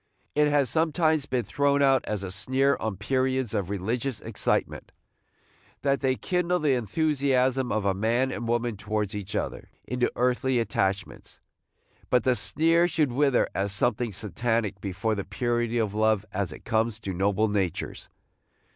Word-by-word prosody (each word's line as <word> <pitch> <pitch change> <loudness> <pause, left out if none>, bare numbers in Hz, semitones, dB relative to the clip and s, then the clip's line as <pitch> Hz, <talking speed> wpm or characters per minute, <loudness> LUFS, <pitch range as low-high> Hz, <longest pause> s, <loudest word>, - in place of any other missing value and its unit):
It 150 0 +3
has 145 -2 +3
sometimes 155 +2 +1
been 125 -2 0
thrown 140 +5 +1
out 135 -1 +4
as 105 -2 -3
a 95 - -5
sneer 130 +8 +1
on 110 -3 -3
periods 130 +2 0
of 100 -4 -1
religious 115 +5 -2
excitement, - - -2 0.9
that 140 0 +1
they 130 -1 +2
kindle 180 +4 0
the 150 -5 +2
enthusiasm 130 - +1
of 100 -3 +1
man 120 +6 +1
and 120 - -4
woman 120 -2 0
towards 105 0 -2
each 100 0 -5
other - - -3 0.2
into 125 0 0
earthly 125 +1 +1
attachments; 100 -4 -2 0.7
but 125 -2 +3
the 130 - +3
sneer 160 - +2
should 155 -6 +1
wither 135 0 +2
as 100 0 -1
something 120 +2 0
satanic 105 +1 -1
before 100 +3 -1
the 100 -2 -2
purity 120 +3 -1
of 110 -3 0
love 110 -1 +2
as 95 -4 -2
it - - -11
comes 110 -1 0
to 95 -3 -4
noble 100 +4 +1
natures. 100 -5 -2
120 Hz, 155 wpm, -26 LUFS, 105-135 Hz, 0.9 s, out